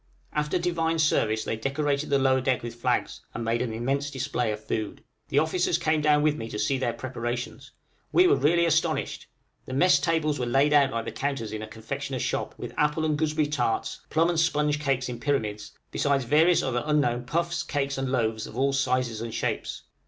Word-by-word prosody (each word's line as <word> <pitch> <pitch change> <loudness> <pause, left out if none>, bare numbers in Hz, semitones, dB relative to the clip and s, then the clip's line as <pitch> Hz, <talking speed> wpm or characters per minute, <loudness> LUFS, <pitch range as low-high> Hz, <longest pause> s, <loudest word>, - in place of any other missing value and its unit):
After 150 +3 0
Divine 165 -2 0
Service 110 -8 +2
they - - -2
decorated 140 +5 -1
the 140 - +3
lower 130 -1 +3
deck 130 -2 0
with 120 -1 -5
flags, 120 - -1
and 115 - -3
made 115 +1 0
an 125 -2 -2
immense 135 +5 -1
display 130 -4 -1
of 105 0 -6
food. 110 -2 -3 0.3
The - - -1
officers 160 +4 +2
came 155 0 +1
down 150 0 +4
with 150 -1 +3
me 115 0 -5
to 105 - -5
see 135 +5 0
their 125 -2 0
preparations. 120 -1 -5 0.4
We 360 - +5
were - - +5
really 170 +4 +3
astonished! 160 -1 0 0.4
The 130 - -4
mess 175 0 +5
tables 155 -1 0
were 125 - -1
laid 135 +4 +3
out 140 -2 +5
like 115 -3 -3
the - - -4
counters 135 -6 -3
in 110 - -4
a 110 - -6
confectioner's 110 +1 -5
shop, - - -2
with - - -7
apple 150 +2 +1
and 155 -1 +1
gooseberry 155 0 +1
tarts, 125 -6 -1
plum 165 +2 +2
and 170 -2 +1
sponge 150 -2 +1
cakes 135 -3 0
in 120 -1 -5
pyramids, 110 -6 -2 0.2
besides 140 -2 +1
various 160 +7 +4
other 125 -2 0
unknown 145 -5 +1
puffs, 170 +4 -1
cakes, 140 -4 -2
and 135 -1 -2
loaves 110 -4 0
of 110 - -10
all 135 +1 +2
sizes 130 -4 0
and 115 -1 -5
shapes. - - -3
140 Hz, 205 wpm, -26 LUFS, 120-150 Hz, 0.4 s, We